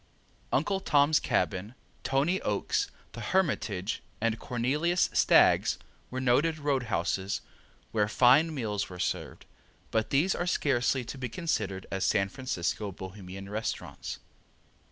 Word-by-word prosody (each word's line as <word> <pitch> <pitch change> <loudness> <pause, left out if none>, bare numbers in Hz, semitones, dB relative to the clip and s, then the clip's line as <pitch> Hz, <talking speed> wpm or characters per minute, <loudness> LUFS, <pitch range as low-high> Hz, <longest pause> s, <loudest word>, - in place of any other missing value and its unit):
Uncle 195 -2 +1
Tom's 145 -3 +4
Cabin, 100 +5 -1 0.3
Tony 145 +8 +1
Oakes, 405 -1 0 0.2
the - - -8
Hermitage, 115 - 0 0.2
and 115 0 0
Cornelius 145 +8 +1
Stagg's - - +5 0.3
were 130 - -4
noted 140 +6 +2
road 145 -3 0
houses 95 +1 -1 0.5
where 105 -2 +2
fine 130 +9 +5
meals 110 -8 -2
were 90 - -8
served, 80 -5 -3 0.5
but 110 0 +1
these 155 +8 +3
are 175 - -2
scarcely 130 -5 +1
to 130 +3 -7
be 125 -1 -3
considered 105 - -2
as 95 0 -1
San 100 -2 +2
Francisco 105 -4 -2
Bohemian 95 +1 -8
restaurants. 110 +2 -4
120 Hz, 125 wpm, -29 LUFS, 100-145 Hz, 0.5 s, Stagg's